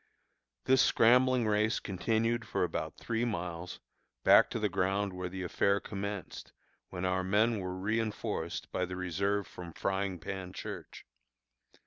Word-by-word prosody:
This 130 Hz, 0 st, +5 dB
scrambling 125 Hz, +1 st, +5 dB
race 105 Hz, +1 st, +2 dB
continued 115 Hz, +5 st, 0 dB
for -, -, 0 dB
about 80 Hz, -2 st, -3 dB
three 115 Hz, 0 st, -2 dB
miles, 90 Hz, -6 st, -4 dB, 0.4 s
back -, -, +7 dB
to -, -, -3 dB
the -, -, +1 dB
ground 95 Hz, +1 st, 0 dB
where 90 Hz, 0 st, -4 dB
the 95 Hz, +1 st, -5 dB
affair 100 Hz, +3 st, +2 dB
commenced, 100 Hz, -2 st, -6 dB, 0.4 s
when 90 Hz, 0 st, -4 dB
our 95 Hz, 0 st, +1 dB
men 105 Hz, +4 st, +2 dB
were 90 Hz, -1 st, -4 dB
reënforced 105 Hz, -3 st, -2 dB
by 90 Hz, -, 0 dB
the 90 Hz, +1 st, -6 dB
reserve 100 Hz, +3 st, -1 dB
from 85 Hz, -2 st, -9 dB
Frying 95 Hz, 0 st, -1 dB
Pan 95 Hz, +2 st, -6 dB
Church. -, -, -8 dB
95 Hz, 140 wpm, -32 LUFS, 90-110 Hz, 0.4 s, back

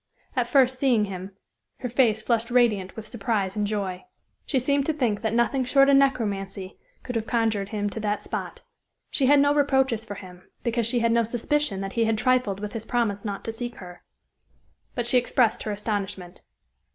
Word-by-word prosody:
At -, -, +1 dB
first 260 Hz, -2 st, +3 dB
seeing 245 Hz, -6 st, +3 dB
him 190 Hz, 0 st, -7 dB, 0.5 s
her 250 Hz, -, -2 dB
face 230 Hz, -3 st, +2 dB
flushed 230 Hz, 0 st, +1 dB
radiant 225 Hz, -6 st, +2 dB
with 220 Hz, -1 st, -8 dB
surprise 205 Hz, -4 st, -2 dB
and 210 Hz, -1 st, 0 dB
joy. 195 Hz, -4 st, -3 dB, 0.4 s
She 275 Hz, -, +1 dB
seemed 280 Hz, +2 st, +1 dB
to 315 Hz, -, +2 dB
think 240 Hz, -9 st, 0 dB
that 220 Hz, -, 0 dB
nothing 235 Hz, +3 st, +1 dB
short 275 Hz, +2 st, +4 dB
of 280 Hz, -, +6 dB
necromancy 200 Hz, -8 st, 0 dB, 0.2 s
could 250 Hz, -, -5 dB
have 225 Hz, -1 st, -2 dB
conjured 220 Hz, -4 st, 0 dB
him 205 Hz, -1 st, -2 dB
to 220 Hz, -, -5 dB
that 210 Hz, -1 st, -2 dB
spot. -, -, -5 dB, 0.5 s
She 270 Hz, -, +1 dB
had 285 Hz, +1 st, +6 dB
no 285 Hz, +1 st, +4 dB
reproaches 265 Hz, -5 st, +2 dB
for 210 Hz, -3 st, -7 dB
him, 180 Hz, -2 st, -12 dB
because 235 Hz, -1 st, 0 dB
she 240 Hz, 0 st, +1 dB
had 230 Hz, 0 st, +2 dB
no 235 Hz, 0 st, +3 dB
suspicion 240 Hz, -1 st, -1 dB
that 195 Hz, 0 st, -5 dB
he 230 Hz, -1 st, +2 dB
had 220 Hz, 0 st, +1 dB
trifled 245 Hz, -4 st, +1 dB
with 210 Hz, 0 st, -5 dB
his 225 Hz, -2 st, -4 dB
promise 225 Hz, -4 st, -1 dB
not 200 Hz, -2 st, -4 dB
to 225 Hz, -, -3 dB
seek 240 Hz, +1 st, -5 dB
her. 180 Hz, -3 st, -11 dB, 0.9 s
But 240 Hz, -, -1 dB
she 250 Hz, +1 st, +4 dB
expressed 245 Hz, -1 st, +1 dB
her 215 Hz, -, -3 dB
astonishment. 200 Hz, -3 st, -4 dB
225 Hz, 195 wpm, -25 LUFS, 205-250 Hz, 0.9 s, of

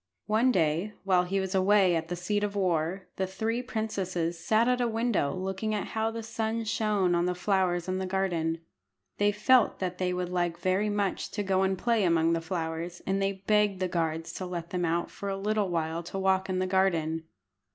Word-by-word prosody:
One 225 Hz, +4 st, +3 dB
day, 170 Hz, +2 st, +1 dB
while 185 Hz, -2 st, +3 dB
he 195 Hz, +2 st, 0 dB
was 190 Hz, 0 st, -2 dB
away 190 Hz, -1 st, +4 dB
at 165 Hz, 0 st, -2 dB
the 175 Hz, -, -3 dB
seat 205 Hz, +4 st, -1 dB
of 205 Hz, 0 st, -2 dB
war, 185 Hz, -1 st, 0 dB
the 190 Hz, -, 0 dB
three 225 Hz, +5 st, -2 dB
princesses 190 Hz, -8 st, -2 dB
sat 220 Hz, +6 st, +2 dB
at 250 Hz, 0 st, +2 dB
a 240 Hz, -, +2 dB
window 225 Hz, -9 st, 0 dB
looking 190 Hz, +3 st, -2 dB
at 205 Hz, -, -3 dB
how 220 Hz, 0 st, 0 dB
the 225 Hz, 0 st, -5 dB
sun 225 Hz, 0 st, -2 dB
shone 210 Hz, -4 st, +1 dB
on 175 Hz, +1 st, +2 dB
the 180 Hz, -, 0 dB
flowers 180 Hz, -2 st, +1 dB
in 185 Hz, 0 st, -1 dB
the 190 Hz, -, -2 dB
garden. 170 Hz, -4 st, -1 dB, 0.6 s
They 205 Hz, 0 st, +4 dB
felt 235 Hz, +4 st, +4 dB
that 180 Hz, -1 st, -3 dB
they 180 Hz, -1 st, +1 dB
would 180 Hz, 0 st, -2 dB
like 175 Hz, -2 st, -1 dB
very 185 Hz, +4 st, +1 dB
much 205 Hz, -2 st, -1 dB
to 205 Hz, -, -1 dB
go 190 Hz, -1 st, +1 dB
and 190 Hz, 0 st, +1 dB
play 230 Hz, 0 st, +1 dB
among 165 Hz, -2 st, +3 dB
the 165 Hz, -, 0 dB
flowers, 165 Hz, 0 st, -4 dB
and 195 Hz, +1 st, 0 dB
they 195 Hz, 0 st, -2 dB
begged 210 Hz, -3 st, +3 dB
the 185 Hz, -, 0 dB
guards 165 Hz, -2 st, -2 dB
to 185 Hz, -, -5 dB
let 170 Hz, -2 st, -5 dB
them 180 Hz, -1 st, 0 dB
out 170 Hz, +1 st, -1 dB
for 200 Hz, -, -5 dB
a 195 Hz, -, -2 dB
little 210 Hz, 0 st, 0 dB
while 165 Hz, -1 st, -1 dB
to 195 Hz, -, -5 dB
walk 190 Hz, 0 st, +1 dB
in 185 Hz, -, 0 dB
the 185 Hz, -, +1 dB
garden. 165 Hz, -4 st, +1 dB
190 Hz, 215 wpm, -29 LUFS, 175-210 Hz, 0.6 s, away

